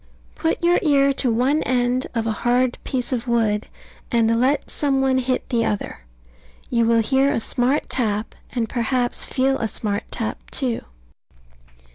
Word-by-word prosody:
Put 325 +1 -2
your 345 +1 +4
ear 280 -3 +3
to 255 -2 0
one 260 +7 +2
end 250 0 0
of 225 -1 0
a 225 - 0
hard 245 +1 +1
piece 250 -1 -2
of 245 0 -3
wood, 225 -3 +1 0.4
and 230 -2 +3
let 275 +3 +1
some 275 -2 +1
one 265 -1 +2
hit 255 0 -1
the 235 -3 +1
other. 210 -2 -3 0.7
You 235 -1 +2
will 230 -1 +3
hear 270 +4 +2
a 285 - 0
smart 250 +5 0
tap; 215 -3 0 0.2
and 235 -2 -1
perhaps 245 +1 0
feel 270 +1 0
a 225 - -1
smart 205 -1 -2
tap, 225 -2 -3
too. 250 -4 -1
245 Hz, 160 wpm, -22 LUFS, 230-270 Hz, 0.7 s, your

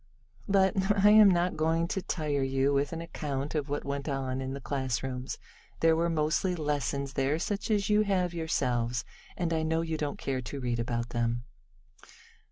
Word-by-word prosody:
But 190 -1 +4 0.3
I 210 - +9
am 215 -1 +8
not 180 0 +2
going 165 +2 +1
to 190 - -1
tire 150 -6 -1
you 135 +1 +1
with 140 +1 +1
an 165 0 -4
account 145 -4 -4
of 150 -2 -2
what 145 - -2
went 140 +1 -3
on 135 -1 -2
in 130 0 -3
the - - -5
classrooms. 130 -1 -3 0.4
There 165 0 +4
were 170 +1 +1
mostly 160 +3 +1
lessons 140 -3 -2
there, 135 +2 +1
such 200 +5 -3
as 205 -2 +2
you 210 0 +4
have 185 -4 +1
yourselves, 125 -7 -1 0.3
and 170 -2 0
I 160 - +1
know 160 +1 +1
you 160 -1 -2
don't 150 -2 -3
care 130 -1 -2
to 140 +3 -6
read 120 -2 -1
about 120 0 -2
them. 120 0 -1
145 Hz, 180 wpm, -29 LUFS, 135-165 Hz, 0.4 s, I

